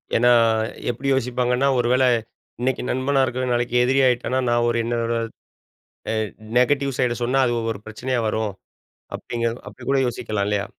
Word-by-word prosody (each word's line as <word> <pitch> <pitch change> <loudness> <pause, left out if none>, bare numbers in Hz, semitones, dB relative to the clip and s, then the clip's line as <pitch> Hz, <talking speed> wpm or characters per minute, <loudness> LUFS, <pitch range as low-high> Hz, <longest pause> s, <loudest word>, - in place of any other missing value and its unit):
ஏனா, 120 +1 +5 0.6
எப்படி 125 +3 -3
யோசிப்பாங்கன்னா, 125 0 +1
ஒருவேள 125 +2 +2 0.6
இன்னைக்கு 130 +1 0
நண்பனா 135 +2 +1
இருக்கிறவன் 130 -1 -1
நாளைக்கு 120 0 -1
எதிரி 130 +2 +2
ஆயிட்டானா, 125 +1 0
நான் 120 0 +2
ஒரு 120 - 0
என்னோட 115 0 -1 1.0
அ - - 0 0.4
நெகட்டிவ் 135 +1 +2
சைட் 120 -1 0
சொன்னா 130 +3 +1
அது 120 - +1 0.2
ஒரு 100 - -10
பிரச்சனையா 120 +3 -2
வரும். 110 -1 -1 0.6
அப்படிங் 115 -1 -4 0.2
அப்படி 105 +4 -11
கூட 135 - +3
யோசிக்கலா 110 -3 -2
இல்லையா? 105 -1 0
125 Hz, 145 wpm, -22 LUFS, 115-130 Hz, 1.0 s, ஏனா